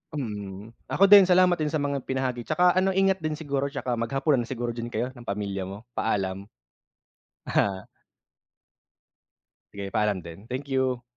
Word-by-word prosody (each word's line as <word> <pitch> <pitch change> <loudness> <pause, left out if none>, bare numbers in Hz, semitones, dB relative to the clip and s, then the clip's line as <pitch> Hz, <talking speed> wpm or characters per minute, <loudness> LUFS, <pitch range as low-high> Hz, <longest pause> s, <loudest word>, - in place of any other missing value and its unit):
Mm, 105 -5 -6 0.2
ako 195 - +1
din, 200 -3 +10
salamat 180 -1 +4
din 155 - 0
sa 150 -1 -1
mga 140 -1 -1
binahagi. 130 -2 -2
Tsaka 180 +3 +4
ano, 190 +1 +1
ingat 195 0 +3
din 155 -1 -2
siguro, 140 -3 -2
tsaka 130 -4 -3
maghapunan 135 +4 +1
na 120 - -3
siguro 120 -2 -3
din 115 0 -5
kayo, 125 +1 -3
ng 120 -2 -14
pamilya 100 -2 -3
mo. 100 +4 -8
Paalam. 100 -4 -2 1.0
Aha. 95 -2 0 1.9
Sige, 100 -1 -6
paalam 105 -4 0
din. 85 +6 -11
Thank 130 +3 -5
you. 130 -2 0
125 Hz, 155 wpm, -26 LUFS, 105-150 Hz, 1.9 s, din